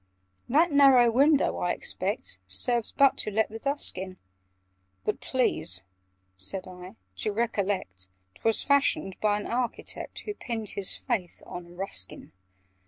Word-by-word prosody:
"That 315 +7 +4
narrow 270 -4 +6
window, 280 +4 +3
I - - 0
expect, - - -2
Serves 240 -3 -1
but 275 -2 +4
to - - -2
let 220 +2 +1
the 225 +1 -8
dusk 280 -7 -2
in—" 185 0 -7 0.9
"But - - -1
please," 95 - +1 0.5
said 185 - +2
I, 185 +2 -11 0.2
"to 215 - -1
recollect 200 - -2 0.3
'Twas 225 -1 +2
fashioned 280 - +1
by 210 -1 +1
an - - -6
architect 245 0 -3
Who 420 - -5
pinned 225 - -5
his 195 -2 +2
faith 210 -9 -4
on 175 0 -9
Ruskin!" 175 - -4
220 Hz, 135 wpm, -27 LUFS, 185-260 Hz, 0.9 s, narrow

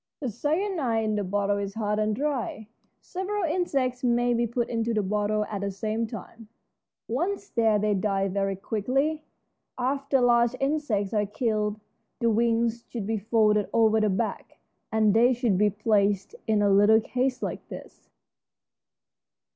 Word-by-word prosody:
The 260 -5 -3
cyanide 295 - -1
in 215 -1 0
the 205 - -1
bottle 200 +1 0
is 200 -1 -4
hard 210 -1 -1
and 215 0 +1
dry. 260 -6 -3 0.3
Several 385 +2 -3
insects 275 -7 -1
may 240 0 +2
be 235 0 +1
put 235 +1 -1
into 230 -1 -1
the 210 - +1
bottle 210 +2 0
at 205 -2 -5
the 200 - -1
same 215 +3 -2
time. 225 +1 -10 0.6
Once 380 - -2
there 225 -2 +2
they 210 0 +1
die 195 0 0
very 195 0 -1
quickly. 265 +10 -1 0.5
After 275 +2 0
large 240 0 +3
insects 270 -9 -1
are 210 -1 +1
killed 210 -1 -1 0.4
the 235 -2 +1
wings 230 +1 +1
should 230 -5 -5
be 220 +1 -1
folded 210 -1 +2
over 220 -1 +4
the 215 - +2
back, 215 +4 -3 0.3
and 215 -2 +3
they 240 +3 +5
should 240 -5 +1
be 210 +3 +3
placed 205 - +1
in 215 -2 +2
a 205 - +3
little 205 +3 +6
case 255 +3 -2
like - - -5
this. - - -11
225 Hz, 155 wpm, -26 LUFS, 210-250 Hz, 0.6 s, little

